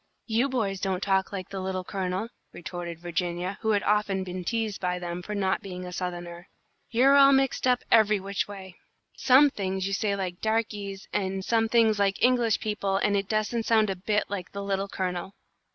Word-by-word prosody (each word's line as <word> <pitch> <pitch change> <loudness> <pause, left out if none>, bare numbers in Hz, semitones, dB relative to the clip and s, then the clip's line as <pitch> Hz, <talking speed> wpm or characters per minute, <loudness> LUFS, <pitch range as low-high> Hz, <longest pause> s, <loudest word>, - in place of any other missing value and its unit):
"You 235 +4 +1
boys 210 -7 -1
don't 190 -1 -1
talk 190 -1 +1
like 190 -3 -5
the 195 - -5
Little 185 0 -3
Colonel," 190 +3 -3 0.2
retorted 175 -1 -6
Virginia, 175 +2 -3
who 220 - -1
had 205 -2 +2
often 205 -2 +1
been 180 0 -5
teased 220 0 -2
by 180 -1 0
them 175 0 -5
for 210 +4 -5
not 190 -2 0
being 180 -2 -7
a 180 - -7
Southerner. 175 -1 -5 0.4
"You're 260 +4 +5
all 275 0 +8
mixed 270 -1 +2
up 250 -1 +2
every 215 -2 +5
which 195 +1 -2
way. 190 -3 -10 0.4
Some 275 +2 +5
things 190 -3 -2
you 195 - -2
say 200 0 0
like 185 -3 -4
darkeys, 205 -3 -2
and 190 -1 -2
some 225 -1 +2
things 225 -3 +3
like 200 -1 +1
English 245 -3 +3
people, 200 -2 -1
and 205 +1 +1
it 195 0 -1
doesn't 220 +1 -1
sound 220 -3 +3
a - - -3
bit 210 +3 0
like 195 -3 -6
the 200 0 -4
Little 195 0 -1
Colonel." 185 0 -4
195 Hz, 195 wpm, -27 LUFS, 185-220 Hz, 0.4 s, all